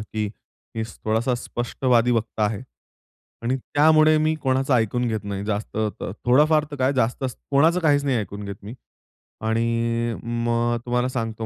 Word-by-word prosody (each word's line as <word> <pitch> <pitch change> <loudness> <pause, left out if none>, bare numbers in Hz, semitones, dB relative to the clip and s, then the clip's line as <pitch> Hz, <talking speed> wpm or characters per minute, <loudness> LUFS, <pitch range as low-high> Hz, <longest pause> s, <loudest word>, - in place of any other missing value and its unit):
की 110 0 -3 0.5
मी 115 - -2 0.2
थोडासा 115 +3 +1
स्पष्टवादी 120 0 0
वक्ता 115 -2 -1
आहे. 105 +2 -2 0.8
आणि 125 +3 0
त्यामुळे 155 +3 +4
मी 155 +1 +2
कोणाचं 130 0 +1
ऐकून 120 +2 +1
घेत 110 -2 -3
नाही 100 0 -4
जास्त. 105 0 -3 0.2
त - - -4
थोडाफार 150 +5 +4
तर 145 - -6
काय 130 +1 +2
जास्तच 125 +1 -1
कोणाचं 160 +6 +4
काहीच 145 -3 +3
नाही 135 -3 +1
ऐकून 100 -1 -5
घेत 100 0 -5
मी. 105 +5 -8 0.7
आणि 115 +1 0 0.3
मग 120 0 +1
तुम्हाला 125 +1 +1
सांगतो, 115 -3 -3
120 Hz, 150 wpm, -23 LUFS, 110-135 Hz, 0.8 s, त्यामुळे